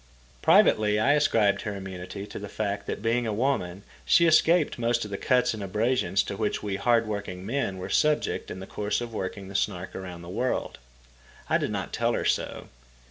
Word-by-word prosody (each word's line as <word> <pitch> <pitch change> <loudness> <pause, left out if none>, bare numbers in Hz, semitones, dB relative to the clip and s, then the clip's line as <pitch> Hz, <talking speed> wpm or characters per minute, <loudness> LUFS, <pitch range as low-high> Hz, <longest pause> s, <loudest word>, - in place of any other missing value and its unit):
Privately 105 -1 +5
I 140 +7 +4
ascribed 110 -9 +3
her 105 -1 -4
immunity 95 +1 -7
to - - -8
the 105 0 -7
fact 100 -1 -3
that, - - -4
being 115 +1 +1
a - - -1
woman, 105 -6 -1 0.2
she 170 - +5
escaped 160 -2 +4
most 120 -1 +1
of 105 - -9
the 100 - -3
cuts 125 -2 +2
and 110 - -6
abrasions 105 +2 +1
to 100 - -5
which 105 +1 -2
we 100 -2 -2
hard 115 0 +3
working 100 -3 -5
men 115 -4 -2
were 95 0 -5
subject 150 +9 +1
in 95 - -6
the 95 - -7
course 105 +1 -2
of 120 -1 -6
working 95 -1 -5
the 100 - -9
Snark 95 -2 -2
around 90 -2 -7
the - - -10
world. 125 +8 -2 0.7
I - - +3
did - - -1
not - - -4
tell - - +1
her - - -1
so. - - -1
105 Hz, 200 wpm, -27 LUFS, 95-120 Hz, 0.7 s, Privately